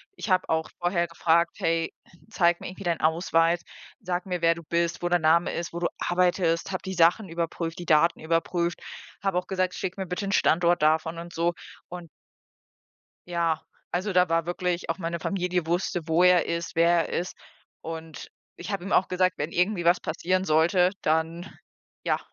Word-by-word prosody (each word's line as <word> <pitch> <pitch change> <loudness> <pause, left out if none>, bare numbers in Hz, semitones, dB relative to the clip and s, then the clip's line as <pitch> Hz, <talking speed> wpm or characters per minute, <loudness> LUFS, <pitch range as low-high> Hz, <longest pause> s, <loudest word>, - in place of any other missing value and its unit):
ich 225 - -6
hab 185 0 +2
auch 160 0 -1
vorher 175 -1 0
gefragt: 170 +1 +1
„Hey, 165 0 0 0.4
zeig 175 -4 +2
mir - - -6
irgendwie 185 +2 -9
deinen 170 -1 0
Ausweis, 165 +1 +2 0.4
sag 180 -4 -3
mir, 180 -2 -3
wer 165 0 +4
du 170 - -10
bist, 170 +2 -1
wo 175 - +1
der 175 - +3
Name 165 +2 +3
ist, 170 0 -4
wo 170 - -4
du 175 - +1
arbeitest“, 175 -1 +1
hab 185 - -3
die 190 - -4
Sachen 175 +5 +3
überprüft, 165 0 -4
die 175 - -6
Daten 165 +1 +3
überprüft, 170 +2 -1 0.4
hab 195 -2 -1
auch 180 0 -1
gesagt: 185 -1 -1
„Schick 185 0 -4
mir 190 - -3
bitte 180 +3 -4
'n 195 - -2
Standort 175 -2 +3
davon“ 160 +2 +2
und 170 0 -8
so. 170 +1 0 0.4
Und 175 -1 -8 1.2
ja, 170 -2 0 0.3
also 190 +3 -1
da 180 -1 +4
war 165 0 +1
wirklich 175 0 -2
auch 165 - -1
meine 170 -1 -3
Familie 180 -1 -1
wusste, 175 -1 -1
wo 165 +3 +3
er 180 -1 +5
ist, 170 0 -3
wer 170 0 +3
er - - -1
ist. 180 - -5 0.5
Und 160 -1 -8 0.3
ich - - -7
hab 195 -3 -2
ihm 195 - -6
auch 190 - +4
gesagt, 185 0 +1
wenn 150 +3 -2
irgendwie 180 +1 +1
was 175 +1 +4
passieren 185 +4 -1
sollte, 175 +3 +3
dann 160 +3 0 0.6
ja. - - +1
170 Hz, 190 wpm, -26 LUFS, 165-180 Hz, 1.2 s, er